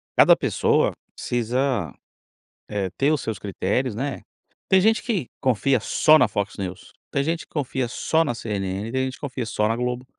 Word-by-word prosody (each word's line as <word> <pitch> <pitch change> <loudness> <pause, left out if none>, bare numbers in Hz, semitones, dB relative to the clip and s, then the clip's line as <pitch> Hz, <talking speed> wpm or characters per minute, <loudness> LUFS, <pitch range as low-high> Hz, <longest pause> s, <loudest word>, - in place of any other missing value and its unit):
cada - - +7
pessoa - - +2 0.2
precisa, 120 - -1 0.8
eh, 100 -3 -2
ter 145 +3 +3
os 150 - +1
seus 110 -4 -4
critérios, 100 +5 -1
né? 135 +3 -3 0.5
Tem 190 -1 +5
gente 220 +2 +3
que 200 - -2
confia 130 0 +2
só 155 +7 +4
na 125 - +5
Fox 100 -1 -3
News, 95 -1 -6 0.2
tem 140 - +1
gente 165 +3 -2
que - - -33
confia 130 -3 -1
só 160 +6 +1
na 120 - -1
CNN, 100 -1 -3
tem 130 +1 0
gente 130 0 -4
que - - -15
confia 130 -4 -4
só 105 0 0
na 115 - 0
Globo, 125 +1 -2
125 Hz, 185 wpm, -23 LUFS, 105-140 Hz, 0.8 s, cada